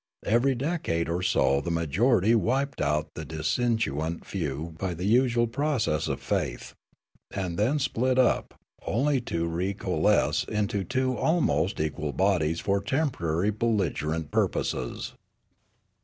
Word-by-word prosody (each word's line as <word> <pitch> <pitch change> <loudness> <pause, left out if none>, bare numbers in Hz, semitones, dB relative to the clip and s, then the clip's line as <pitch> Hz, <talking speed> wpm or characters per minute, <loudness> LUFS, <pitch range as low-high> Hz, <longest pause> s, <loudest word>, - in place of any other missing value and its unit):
Every 120 +5 +3
decade 130 - -1
or 85 +2 -1
so 70 -5 +2
the 80 - -4
majority 95 - +2
wiped 130 +4 0
out 75 +1 0
the 80 - -6
dissentient 80 - -1
few 80 -2 -4
by 95 -3 -2
the 90 +3 -4
usual 120 +2 +3
process 115 - 0
of - - -2
faith, - - -3 0.6
and 90 -3 -3
then 115 - +2
split 130 -2 0
up, 130 - +2 0.3
only 135 +4 +1
to 85 -7 -2
re 90 +4 -2
co - - -5
alesce - - +3
into 105 -2 -1
two 130 +3 0
almost 100 - +1
equal 75 -1 -2
bodies 85 -5 +1
for 100 +2 0
temporary 100 - 0
bel 115 +2 0
ligerent 80 -4 -2
purposes. - - -1
100 Hz, 135 wpm, -27 LUFS, 80-120 Hz, 0.6 s, Every